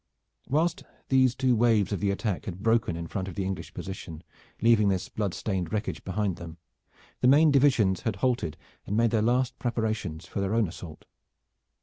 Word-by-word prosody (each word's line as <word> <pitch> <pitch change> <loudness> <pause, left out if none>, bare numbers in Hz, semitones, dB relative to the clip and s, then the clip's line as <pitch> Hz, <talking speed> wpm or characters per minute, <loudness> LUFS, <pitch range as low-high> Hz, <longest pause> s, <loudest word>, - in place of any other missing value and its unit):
Whilst 160 +4 +1 0.3
these 130 -2 +4
two 130 -2 +2
waves 110 -4 +3
of 100 - -1
the 100 - 0
attack 100 -1 -2
had 95 +1 -6
broken 115 -6 +2
in 85 0 -5
front 95 +3 -4
of 95 - -7
the 95 - -2
English 95 -1 -4
position, 85 -4 -7 0.4
leaving 110 -2 +4
this 95 -2 -1
blood 100 -4 -2
stained 95 -5 -2
wreckage 105 0 -3
behind 95 -1 -1
them, 85 -1 -9 0.6
the - - +3
main 150 +4 +6
divisions 130 -9 +3
had 110 -3 -1
halted 120 - -1 0.3
and 105 - -1
made 115 -1 +3
their 110 - +2
last 125 +3 +1
preparations 110 -9 -2
for - - -5
their 100 +3 0
own 115 -3 +3
assault. 80 -1 -10
105 Hz, 185 wpm, -27 LUFS, 95-120 Hz, 0.6 s, main